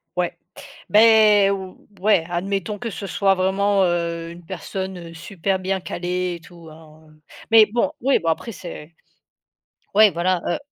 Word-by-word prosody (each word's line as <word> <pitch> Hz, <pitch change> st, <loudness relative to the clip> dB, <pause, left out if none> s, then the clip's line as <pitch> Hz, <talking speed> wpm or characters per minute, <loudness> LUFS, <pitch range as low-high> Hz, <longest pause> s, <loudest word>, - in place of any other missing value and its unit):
Ouais -, -, -2 dB, 0.5 s
beh, 215 Hz, -2 st, +6 dB
o 190 Hz, -2 st, -4 dB, 0.2 s
ouais, 195 Hz, -3 st, +3 dB
admettons 195 Hz, +3 st, -3 dB
que 230 Hz, +1 st, -5 dB
ce 195 Hz, +3 st, -6 dB
soit 195 Hz, 0 st, +2 dB
vraiment, 195 Hz, +2 st, +1 dB
heu, 170 Hz, -1 st, -1 dB
une 170 Hz, 0 st, -12 dB
personne, 190 Hz, +1 st, -5 dB
heu, -, -, -12 dB
super 190 Hz, +3 st, -3 dB
bien 190 Hz, +1 st, -2 dB
calée 180 Hz, 0 st, -3 dB
et -, -, -10 dB
tout, 165 Hz, -1 st, -15 dB
hein, 155 Hz, 0 st, -17 dB, 0.4 s
mais 225 Hz, -1 st, +7 dB
bon, 240 Hz, +7 st, -1 dB
oui, 270 Hz, +2 st, +2 dB
bon, 165 Hz, -, -6 dB
après, 165 Hz, +8 st, -2 dB
c'est 170 Hz, -4 st, -10 dB, 1.0 s
ouais 215 Hz, 0 st, +7 dB
voilà, 175 Hz, +1 st, 0 dB
heu -, -, -1 dB
190 Hz, 155 wpm, -21 LUFS, 170-205 Hz, 1.0 s, mais